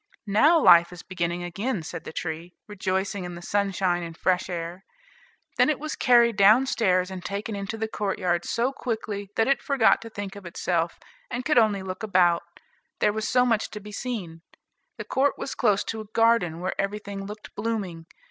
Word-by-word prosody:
"Now 290 +12 +5
life 170 - +7
is 180 -1 -10
beginning 175 -1 -3
again," 195 +3 -3
said - - -7
the - - -6
tree, 165 +2 -5
rejoicing 190 -1 -2
in 175 -1 -6
the 170 - -9
sunshine 190 -3 0
and 165 -1 -7
fresh 185 0 +1
air. 175 +1 -5 0.8
Then - - +5
it 305 - 0
was 305 +1 -4
carried 235 -2 +4
down 215 +6 +6
stairs 185 -7 +1
and 185 -1 -7
taken 205 +3 -4
into 200 +2 -4
the 220 0 -2
courtyard 185 -5 -1
so 240 +4 -1
quickly, 215 -5 -4
that 225 - +2
it 275 -1 +2
forgot 270 -6 +3
to 230 - -8
think 205 -2 -6
of 200 - -10
itself, 170 -1 -1 0.3
and 250 0 -4
could 300 -6 +4
only 210 -4 +2
look 185 -1 -6
about, 180 -5 +3 0.6
there 210 - +2
was 220 0 -2
so 250 0 +4
much 225 -3 +1
to 210 - -7
be 210 0 -11
seen. 200 -8 -5 0.6
The - - -6
court 275 +1 +1
was - - -4
close 210 -5 +2
to 220 -1 -4
a - - -9
garden, 225 -8 +3
where 185 - -2
everything 200 -1 -5
looked 210 +1 -10
blooming. 200 -7 -4
200 Hz, 190 wpm, -25 LUFS, 180-225 Hz, 0.8 s, life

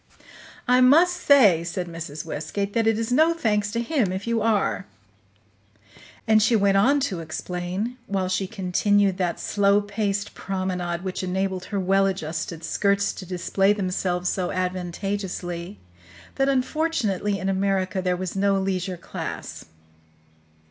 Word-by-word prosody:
"I 250 +1 +5
must 330 +8 +6
say," 245 - +5
said 175 +1 -3
Mrs. 165 -3 -7
Westgate, 200 +6 -4
"that 225 -1 +1
it 225 -1 +3
is 225 +1 -2
no 315 +6 +4
thanks 210 -8 0
to 230 - 0
him 235 - 0
if 190 +1 -4
you 230 -1 0
are." 200 - 0 1.4
And 215 0 +5
she 225 +2 +3
went 200 -2 +3
on 275 +9 +4
to 200 -10 -2
explain, 180 +8 -4
while 190 -2 -1
she 185 +1 -1
continued 195 +1 +1
that 175 -2 -1
slow 200 0 +2
paced 205 0 -2
promenade 180 -2 -3
which 185 -1 -3
enabled 185 0 -2
her 200 0 -3
well 195 +1 +3
adjusted 165 -3 -4
skirts 200 +3 +1
to 185 - -9
display 195 +2 +1
themselves 185 -2 -1
so 180 -1 -1
advantageously, 185 0 -3 0.6
that 270 0 +1
unfortunately 255 - 0
in 190 - -4
America 195 0 0
there 180 -1 0
was 185 0 -4
no 200 0 +2
leisure 185 -1 -2
class. 170 - -7
195 Hz, 140 wpm, -24 LUFS, 180-210 Hz, 1.4 s, must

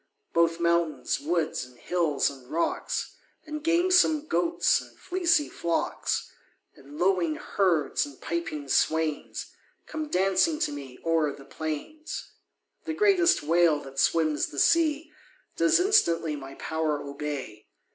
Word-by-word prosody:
Both 170 0 +2
mountains, 170 -4 +1
woods, 160 -1 -1
and 125 -1 -14
hills, 165 -1 0
and 130 -2 -14
rocks 170 +2 -2 0.3
And 305 -1 -6
gamesome 335 -2 +3
goats, 335 +2 +2
and - - -15
fleecy 340 -4 +1
flocks, 170 -1 -2 0.4
And 140 +2 -13
lowing 175 -3 +2
herds, 170 -7 +1
and 140 -2 -9
piping 155 -4 -4
swains, 155 +2 0 0.3
Come 310 -1 -5
dancing 195 - +2
to - - +1
me 140 -3 -8
o'er 165 -3 +2
the 135 - -14
plains. 160 - -6 0.5
The 315 - -3
greatest 380 - +4
whale 165 -1 +3
that 135 0 -8
swims 155 -2 +2
the 145 - -11
sea 315 - +2 0.4
Does 330 +1 +4
instantly 170 - +3
my 135 -1 -9
power 160 -2 -2
obey. 140 -6 -6
165 Hz, 125 wpm, -27 LUFS, -, 0.5 s, greatest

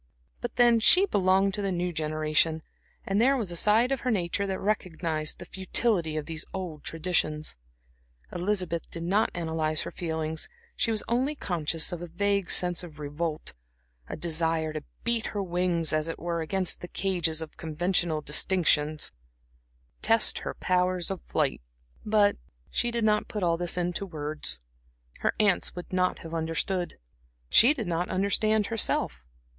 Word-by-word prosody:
But 240 - -5
then 240 -1 +5
she 365 - +7
belonged 195 - +2
to 205 - -1
the 195 -1 -1
new 180 0 -2
generation; 155 0 0 0.4
and 195 +2 +1
there 270 +3 +4
was 210 -8 -2
a - - -5
side 220 +8 +3
of 270 - 0
her 250 - -2
nature 200 -1 0
that 190 -1 -2
recognized 165 -6 -2
the - - -9
futility 185 -3 +1
of 150 - -3
these 160 -1 -5
old 175 -6 -5
traditions. 155 - -1 0.8
Elizabeth 180 -2 -1
did 165 - -6
not 200 +6 +2
analyze 160 -2 -1
her - - -6
feelings; 160 -2 -2 0.3
she - - 0
was 220 -2 +1
only 260 +6 0
conscious 165 - -1
of 175 -1 -5
a 175 - -5
vague 200 +2 0
sense 180 -1 +3
of 160 -4 -11
revolt, 150 +2 -4 0.6
a - - -4
desire 160 -1 0
to 155 - -4 0.2
beat 235 -1 +1
her 205 -2 -3
wings 175 -2 0
as 155 +1 +1
it 165 - -4
were, 170 0 -2
against 185 +3 0
the 175 - -6
cages 175 -5 -1
of 160 -1 -6
conventional 165 0 0
distinctions, 155 -1 +2
and - - -38
test 225 0 +4
her - - -5
powers 180 -1 0
of 190 - -4
flight. - - -1 0.4
But 210 -1 +3 0.3
she 240 - 0
did 235 -1 -1
not 210 -1 +2
put 210 -3 -4
all 170 -1 +3
this 175 +1 0
into 180 +3 -1
words. 150 - -2 0.6
Her - - 0
aunts 210 -3 +2
would 180 +1 -8
not 185 0 +1
have 165 - -8
understood. 165 +3 -2 0.5
She 240 +5 +8
did 235 -7 -3
not 175 +1 -1
understand 210 +3 +1
herself. 210 - 0
175 Hz, 165 wpm, -27 LUFS, 160-200 Hz, 0.8 s, She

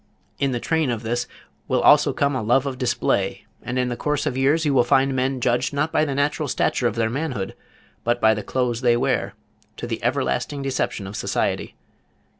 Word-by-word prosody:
In 140 -1 +1
the 120 - -1
train 160 +1 0
of 120 -2 -2
this 120 +2 -1 0.4
will - - +1 0.3
come 140 -1 +1
also 130 - -1
a - - -6
love 130 +3 +3
of 130 -2 -4
display, 115 -6 0 0.2
and 125 - -4
in 125 0 +1
the 120 - -2
course 150 +4 -1
of 125 - -1
years 145 +5 +2
you 145 - +2
will 125 -2 +5
find 135 +2 +2
men 130 +1 0
judged 125 +2 0
not 150 +3 0
by 155 - +2
the 140 -2 -3
natural 145 +2 0
stature 125 -1 +1
of 115 - -2
their 115 -1 +1
manhood, 125 -8 -3 0.5
but 120 +1 +1
by 110 -1 +5
the 105 - -3
clothes 125 0 -1
they 120 -2 +3
wear, - - -1 0.4
to - - -5
the - - -4
everlasting 140 - -1
deception 130 -6 -2
of 95 +2 -7
society. - - -2
125 Hz, 210 wpm, -23 LUFS, 120-140 Hz, 0.5 s, will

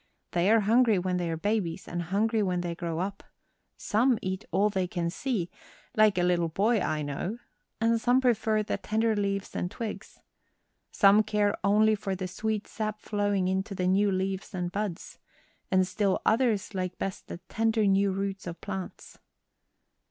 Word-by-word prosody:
They 175 +3 +2
are 225 0 +5
hungry 225 +1 +4
when 180 0 -1
they 175 -1 -1
are 165 - -2
babies 200 -2 -1
and 175 0 -3
hungry 215 +6 +1
when 180 -3 0
they 175 -1 -3
grow 170 -1 -4
up. 195 +3 -3 0.5
Some 235 +3 +2
eat 190 +2 -3
all 200 +5 +2
they 190 -2 0
can 170 -1 -2
see 200 -4 -2 0.4
like 215 -3 +4
a 175 - +2
little 175 -1 +2
boy 215 +7 +2
I 155 -4 -1
know 145 +10 -3 0.4
and 230 0 +2
some 245 +2 +4
prefer 220 -4 +2
the - - -2
tender 220 +1 0
leaves 200 -1 -2
and 180 - -2
twigs. 225 +2 -7 0.7
Some 200 +1 +6
care 210 -1 +1
only 215 +2 +4
for 200 -2 -2
the 185 0 -4
sweet 215 +3 -2
sap 215 -1 -4
flowing 205 -3 0
into 190 +2 -1
the 180 - -1
new 195 +2 +3
leaves 190 +1 -2
and 175 -1 -2
buds. 200 -4 -4 0.5
And 185 0 +3
still 195 +1 0
others 220 -4 +2
like 185 -1 -3
best 195 - -5
the - - -6
tender 225 -1 +1
new 195 0 +3
roots 195 0 -3
of 170 0 -6
plants." 195 -2 -7
195 Hz, 175 wpm, -28 LUFS, 185-215 Hz, 0.7 s, Some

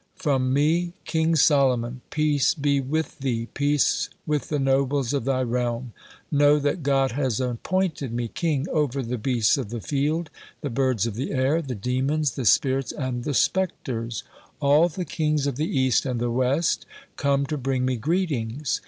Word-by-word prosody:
"From 135 -8 0
me, 165 +5 +2
King 160 0 +1
Solomon! 130 -5 +3
Peace 150 -1 +2
be 140 -2 +1
with 155 +3 -3
thee, 120 -4 -2
peace 145 0 +1 0.2
with 150 -2 -1
the 150 - 0
nobles 135 -1 +1
of 140 -5 -1
thy 130 -1 +1
realm! 120 0 -2 0.4
Know 145 0 +5
that 145 +4 -1
God 135 -2 +2
has 130 -3 -1
appointed 140 +3 -1
me 120 0 -2
king 150 +2 -1
over 140 -4 0
the 120 0 -3
beasts 120 +1 +2
of 120 -6 -4
the 120 +1 -4
field, 150 +7 -1 0.3
the 145 - -3
birds 130 -3 +1
of 115 - -3
the 125 +6 -3
air, 140 +4 +1
the 130 -5 -5
demons, 130 +7 0
the 130 - -5
spirits, 130 +5 +3
and 125 -3 -4
the 145 - -1
spectres. 120 - -1 0.4
All 150 +5 +4
the 180 +2 -5
kings 150 -2 0
of 140 -3 -2
the 155 +2 -1
East 130 0 +2
and 125 -2 -2
the 120 0 -1
West 130 +6 +1 0.3
come 140 0 +1
to 150 - -3
bring 130 -2 -1
me 130 0 +1
greetings. 140 - -1
135 Hz, 170 wpm, -24 LUFS, 125-150 Hz, 0.4 s, Know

